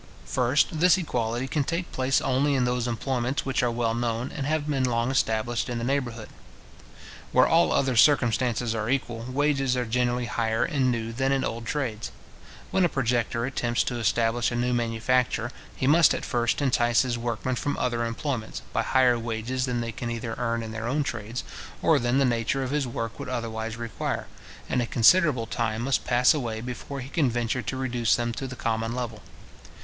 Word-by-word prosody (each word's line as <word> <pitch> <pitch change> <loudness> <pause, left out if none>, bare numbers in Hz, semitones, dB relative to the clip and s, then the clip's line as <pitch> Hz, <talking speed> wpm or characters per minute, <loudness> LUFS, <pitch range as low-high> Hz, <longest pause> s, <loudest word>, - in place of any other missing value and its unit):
First, 130 +5 +1
this 180 +3 +5
equality 120 -7 -2
can 145 +1 0
take 170 +4 -3
place 130 +1 +1
only 135 +2 +1
in 130 -2 +2
those 125 0 0
employments 125 +2 -1
which 135 -1 0
are 125 - +2
well 115 -1 0
known, 120 +1 -2
and 140 -2 -4
have 155 -1 0
been 140 -3 0
long 120 0 +1
established 120 -1 0
in 120 - -2
the 115 - -3
neighbourhood. 120 -4 -2 1.0
Where - - +5
all 165 +1 +4
other 130 -2 +1
circumstances 120 -2 +3
are 110 0 -2
equal, 120 -3 -1
wages 135 -1 +1
are 125 - 0
generally 120 +1 0
higher 115 -1 0
in 140 -6 +1
new 115 -1 -2
than 135 +3 0
in 135 -1 +1
old 115 0 -4
trades. 115 -7 -3 0.6
When 190 - +2
a 175 - +4
projector 120 -3 0
attempts 120 -2 0
to 120 -1 -3
establish 115 +1 +1
a - - -2
new 125 +1 0
manufacture, 120 0 0 0.2
he - - -2
must 155 +3 +5
at - - -4
first 120 +2 0
entice 120 -3 +3
his 120 -2 -2
workmen 120 +2 -2
from 145 +3 -2
other 120 -2 0
employments, 115 0 -3
by - - +2
higher 125 -2 +3
wages 115 +3 -2
than 120 -1 -1
they 115 0 -3
can 120 +2 -5
either 115 -1 -4
earn 115 -1 -1
in 110 - -6
their 110 +1 -4
own 145 +4 +1
trades, 120 -2 -4 0.4
or - - +3
than 120 +2 +1
the 140 - +4
nature 120 +2 0
of 130 - -3
his 145 -3 0
work 115 -1 -4
would - - -5
otherwise 115 -2 -4
require; 115 -3 -3 0.4
and 125 - 0
a 120 - -2
considerable 130 0 +4
time 115 -1 -2
must 135 +1 0
pass 125 0 +4
away 120 -7 -3
before 125 +3 -6
he 130 - -8
can 145 -3 +1
venture 120 +1 -1
to 130 +4 -4
reduce 120 -3 +1
them 120 -1 -2
to 135 +3 -4
the 130 - -7
common 115 0 -2
level. 115 -4 -4
120 Hz, 195 wpm, -26 LUFS, 115-130 Hz, 1.0 s, this